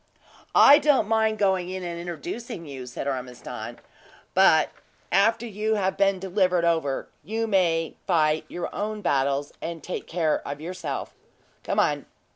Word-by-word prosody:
"I 290 +2 +9
don't 285 -7 +3
mind 220 -1 +2
going 190 -3 +1
in 185 0 -5
and 170 -1 -5
introducing` 225 - -6
you," 130 -3 -7
said 125 +3 -5
Ormiston; 125 -2 -5 0.6
"but - - +5 0.4
after 225 +5 +3
you 215 0 -1
have 190 -2 0
been 195 -1 +3
delivered 185 -2 +1
over, 160 -5 0 0.2
you 225 +2 -2
may 170 -6 +1
fight 155 -1 +2
your 175 -1 -5
own 210 0 -3
battles, 140 -1 0
and 165 -1 -5
take 180 - -5
care 165 -3 0
of 145 +1 -5
yourself. 165 -3 -5 0.5
Come - - 0
on." - - +1
180 Hz, 145 wpm, -25 LUFS, 155-210 Hz, 0.6 s, I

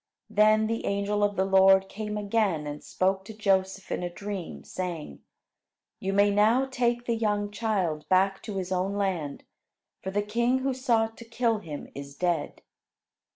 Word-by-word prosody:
Then 215 +1 +4
the 225 +1 -2
angel 200 +1 0
of 205 0 +1
the 190 - +1
Lord 190 0 +5
came 210 +1 -5
again 205 -6 0
and 145 0 -6
spoke 190 +1 0
to 220 - -9
Joseph 195 -2 0
in - - -1
a 175 - -2
dream, 200 0 -6
saying: 170 - -5 0.8
"You 190 - -2
may 200 +1 +4
now 220 +6 +4
take 240 -2 0
the 235 - +1
young 210 -2 0
child 195 -8 -1
back 195 +1 +3
to 210 -3 -4
his 185 -1 -4
own 190 +2 0
land, 180 -8 -2 0.6
for 190 - -4
the 205 +2 0
king 235 +4 +1
who 270 - +1
sought 230 -4 +1
to 235 - -10
kill 230 -1 0
him 155 -7 -7
is 140 0 -8
dead." 170 -3 -1
200 Hz, 170 wpm, -27 LUFS, 185-220 Hz, 0.8 s, Lord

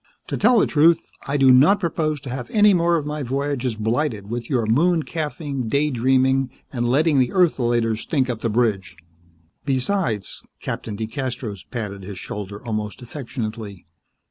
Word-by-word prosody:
"To - - -1
tell 245 - +4
the - - +5
truth, 160 +2 +3 0.2
I 140 +1 0
do 135 -2 +6
not 145 +11 +6
propose 155 -4 -1
to 135 -3 -7
have 125 -2 -5
any 210 -1 +5
more 170 -1 +3
of 155 -3 -1
my 150 0 -3
voyages 135 -2 -2
blighted 110 -1 -1
with 120 -1 -4
your 125 -5 +1
moon 160 +9 +3
calfing, 150 -5 -4
day 145 +4 +1
dreaming 130 +1 +2 0.2
and 120 -2 0
letting 145 +2 +3
the 125 -1 +3
ertholaters 120 - +2
stink 135 -5 0
up 120 -3 -3
the 115 - -1
bridge. 105 -5 0 0.7
Besides 130 - -1
" - - -53
Captain 105 -3 -5
DeCastros 115 -3 -5
patted 105 -5 -5
his 95 0 -8
shoulder 100 +3 -7
almost 110 +1 -4
affectionately. 110 - -6
130 Hz, 165 wpm, -22 LUFS, 110-150 Hz, 0.7 s, do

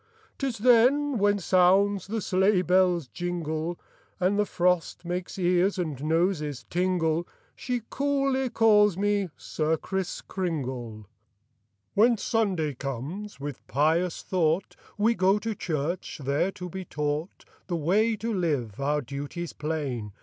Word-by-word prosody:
'Tis 270 -4 -2
then 250 +4 +4
when 205 0 +3
sounds 190 +2 +3
the 220 +1 -2
sleigh 190 0 +2
bell's 180 -4 +3
jingle 170 +2 -3 0.4
And 190 +3 +2
the 210 - +2
frost 180 -1 0
makes 180 +2 -4
ears 180 +2 +2
and 155 -6 -3
noses 160 -3 0
tingle, 175 -2 +1 0.3
She 245 -3 -3
coolly 275 -2 +1
calls 210 -4 +4
me 205 -1 +1
'Sir 160 +1 -1
Kriss 190 +2 -3
Kringle.'" 130 - -4 0.9
Copyrighted, 230 +4 +5
18U7 - - 0
c^^aHEN - - -14
Sunday 190 - 0
comes, 140 - -6
with 145 -2 -7
pious 160 +5 +1
thought 170 0 0 0.2
We 220 +3 +3
go 190 0 +3
to 220 +1 -3
church, 170 -2 -3
there 140 +8 +1
to 180 - -7
be 190 +2 -6
taught 150 +1 -3 0.2
The 175 -2 -1
way 210 +9 +2
to 225 +2 -3
live, 145 - -1
our 145 +2 +1
duties 145 +6 -6
plain. 140 -9 -3
180 Hz, 135 wpm, -27 LUFS, 155-205 Hz, 0.9 s, Copyrighted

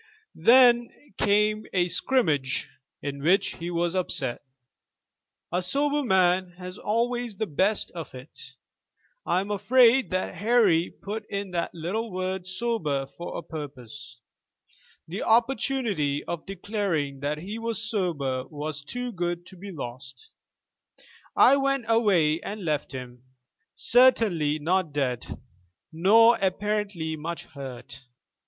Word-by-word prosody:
Then 240 +4 +5 0.3
came 210 +1 +2
a 180 -2 +2
scrimmage, 160 - +1 0.3
in 140 -1 -4
which 190 +6 +2
he 170 +1 -5
was 175 +1 -1
upset. 135 -9 -1 1.1
A 180 +2 0
sober 285 +9 0
man 185 -4 +2
has 180 +1 -8
always 235 0 -1
the 220 - -1
best 195 +5 0
of 165 -6 -8
it." 130 -1 -11 0.7
I 185 - +2
am 200 +2 -5
afraid 235 +5 +4
that 185 0 -2
Harry 200 -4 +3
put 210 +1 -7
in 200 -1 -4
that 170 -1 -3
little 200 +7 -3
word 185 0 -3
sober 185 -9 -1
for 170 - -6
a - - -6
purpose. 135 -4 -9 0.9
The 180 +6 -5
opportunity 230 - +1
of 170 +1 -6
declaring 190 -9 -2
that 145 +2 -2
he 200 +8 -6
was 225 -1 -2
sober 145 - -2
was 150 0 -5
too 245 +11 -5
good 175 -3 -3
too 185 - -14
be 200 +3 -9
lost. 130 -4 -9 1.0
"I 275 +2 +6
went 275 -2 0
away 190 -9 +3
and 205 -2 -6
left 150 -3 -1
him, 125 -2 -8 0.5
certainly 215 - +4
not 165 +1 0
dead, 130 -4 -2 0.5
nor 225 +8 +5
apparently 195 -4 -1
much 165 +3 -5
hurt. 130 -3 -9
185 Hz, 125 wpm, -26 LUFS, 150-220 Hz, 1.1 s, I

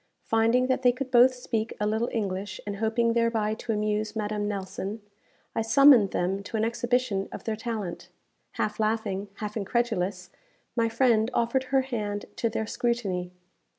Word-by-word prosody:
Finding 230 +3 +3
that 260 0 0
they 250 -1 +5
could 255 +1 -5
both 250 +1 +7
speak 230 -3 -3
a 210 - 0
little 220 +3 0
English, 200 -2 -3
and 205 -1 -4
hoping 225 +2 +1
thereby 230 -2 +1
to 230 +1 -4
amuse 210 0 -1
Madame 210 -1 -2
Nelson, 200 +1 -4 0.5
I - - 0
summoned 245 -2 +6
them 190 +3 -1
to 220 +3 -5
an 220 - +1
exhibition 235 -3 0
of - - -7
their 220 - -2
talent. 215 -5 -5 0.4
Half 215 - -2
laughing, 215 -2 -1
half 210 0 -5
incredulous, 200 -4 -1 0.4
my 230 -2 +2
friend 225 -2 +3
offered 235 +3 +1
her 270 +1 +2
hand 210 -6 -3
to 230 - +1
their 220 - -2
scrutiny. 205 -7 -1
220 Hz, 160 wpm, -27 LUFS, 205-235 Hz, 0.5 s, both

